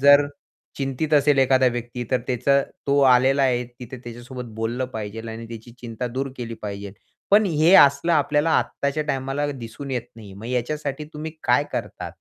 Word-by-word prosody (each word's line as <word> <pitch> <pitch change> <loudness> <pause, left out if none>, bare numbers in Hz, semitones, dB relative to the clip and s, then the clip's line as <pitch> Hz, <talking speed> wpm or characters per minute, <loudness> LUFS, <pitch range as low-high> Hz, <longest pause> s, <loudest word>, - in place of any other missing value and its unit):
जर 145 +1 +7 0.5
चिंतित 135 +3 -2
असेल 145 -1 +4
एखादा 130 0 +4
व्यक्ती 120 0 -2
तर 130 -2 +2
त्याचा 130 +3 +2 0.3
तो 140 0 +3 0.2
आलेला 135 +2 +3
आहे, 125 -2 +2 0.2
तिथे 125 +1 -8
त्याच्यासोबत 120 +2 -8
बोललं 120 +3 -2
पाहिजे 110 +1 -5
आणि 115 +1 -7
त्याची 115 +1 -10
चिंता 120 +1 -5
दूर 130 +3 -3
केली 115 -2 -5
पाहिजे. 100 -1 -6 0.4
पण 210 +2 +6
हे 165 +2 +4
असलं 140 +3 +6
आपल्याला 150 +1 +2
आत्ताच्या 140 +2 -2
टाईमाला 135 +1 -1
दिसून 130 +2 -8
येत 125 -3 -1
नाही. 105 -4 -11
मग 110 +4 -9
याच्यासाठी 140 +4 -2
तुम्ही 155 +1 -5
काय 125 +4 +3
करता? - - -4
130 Hz, 165 wpm, -23 LUFS, 120-140 Hz, 0.5 s, जर